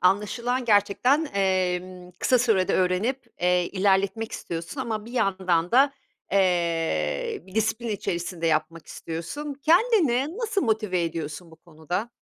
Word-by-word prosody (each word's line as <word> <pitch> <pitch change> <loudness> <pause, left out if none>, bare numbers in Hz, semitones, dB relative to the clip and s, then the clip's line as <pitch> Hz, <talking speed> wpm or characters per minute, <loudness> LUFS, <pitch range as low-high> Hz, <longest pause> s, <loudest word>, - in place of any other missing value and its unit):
anlaşılan 235 +7 +1
gerçekten, 225 +8 +3
emm, 185 -1 -1
kısa 255 - +3
sürede 220 -6 +2
öğrenip, 190 +9 0
eee, 180 0 +2
ilerletmek 200 +3 +1
istiyorsun 170 - -5
ama 220 -4 -3
bir 235 - -11
yandan 185 -6 +1
da, 275 +3 +5 0.4
eee, 180 - 0
bir 190 - -15
disiplin 225 +2 0
içerisinde 175 -4 -3
yapmak 160 0 -1
istiyorsun. 225 - -6
Kendini 330 - +3
nasıl 445 -4 -1
motive 215 -6 0
ediyorsun 165 +1 -5
bu 160 - -15
konuda? 170 +7 -5
195 Hz, 125 wpm, -25 LUFS, 175-245 Hz, 0.4 s, da